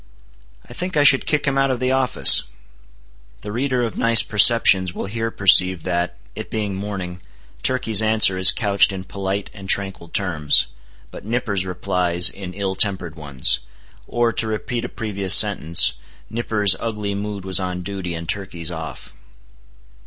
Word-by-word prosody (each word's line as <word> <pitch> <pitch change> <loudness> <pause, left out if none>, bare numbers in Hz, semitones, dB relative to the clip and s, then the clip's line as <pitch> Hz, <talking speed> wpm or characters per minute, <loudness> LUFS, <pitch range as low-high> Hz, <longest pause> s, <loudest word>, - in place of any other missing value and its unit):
"I - - -12
think 180 +4 -5
I 145 - +3
should 135 -2 +3
kick 150 -1 0
him 135 -1 -1
out 135 0 +1
of 130 -2 -2
the 130 0 -1
office." 130 -2 +4 1.0
(The 105 - -8
reader 125 +2 -2
of 115 - -5
nice 115 -1 +4
perceptions 100 -4 +3
will - - -5
here 115 +3 -4
perceive 95 -4 +3
that, 90 -1 -3 0.2
it - - -9
being 105 -2 -4
morning, 95 -2 -7 0.4
Turkey's 115 -5 +2
answer 110 -3 +3
is 95 0 +5
couched 100 -4 +1
in 95 -1 -7
polite 100 +1 -6
and 95 -2 -12
tranquil 95 -4 -2
terms, 85 -6 +1 0.5
but - - -11
Nippers 105 -4 -3
replies 90 -1 +1
in 90 -2 -10
ill 100 -1 -3
tempered 95 -5 -1
ones. 70 -4 0 0.5
Or, 120 -1 -1
to 110 - -1
repeat 110 +2 -5
a - - -7
previous 100 -4 +2
sentence, 80 +3 +4 0.4
Nippers' 105 -4 +1
ugly 105 -3 -5
mood 100 -1 -6
was 95 0 -2
on 90 -1 -5
duty 95 -3 -6
and 85 0 -8
Turkey's 90 -4 -4
off.) 80 -2 -9
100 Hz, 160 wpm, -19 LUFS, 90-115 Hz, 1.0 s, is